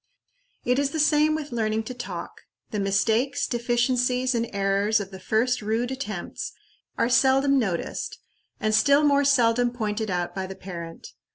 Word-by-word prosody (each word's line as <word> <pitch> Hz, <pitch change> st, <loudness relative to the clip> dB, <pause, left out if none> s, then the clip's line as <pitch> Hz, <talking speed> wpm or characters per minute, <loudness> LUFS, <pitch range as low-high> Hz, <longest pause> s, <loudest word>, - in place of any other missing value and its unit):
It 250 Hz, +2 st, +2 dB
is 285 Hz, -1 st, +1 dB
the 315 Hz, -, -4 dB
same 305 Hz, 0 st, +3 dB
with 300 Hz, -2 st, -5 dB
learning 220 Hz, -1 st, -1 dB
to 255 Hz, -, -6 dB
talk. 245 Hz, 0 st, -7 dB, 0.3 s
The 210 Hz, -, -2 dB
mistakes, 220 Hz, +8 st, +1 dB
deficiencies, 250 Hz, +1 st, +1 dB
and 235 Hz, -1 st, -1 dB
errors 200 Hz, +2 st, +1 dB
of 200 Hz, -1 st, -6 dB
the 190 Hz, -, -9 dB
first 230 Hz, +5 st, +1 dB
rude 225 Hz, +4 st, -1 dB
attempts 215 Hz, -9 st, -5 dB, 0.4 s
are -, -, +2 dB
seldom 265 Hz, +3 st, +4 dB
noticed, 190 Hz, -8 st, -3 dB, 0.4 s
and 215 Hz, 0 st, 0 dB
still 280 Hz, +7 st, +5 dB
more 285 Hz, -1 st, +4 dB
seldom 245 Hz, -3 st, +3 dB
pointed 220 Hz, -2 st, -3 dB
out 175 Hz, -1 st, -2 dB
by 190 Hz, -1 st, -4 dB
the 190 Hz, -, -8 dB
parent. 170 Hz, -3 st, -8 dB
235 Hz, 160 wpm, -25 LUFS, 210-265 Hz, 0.4 s, still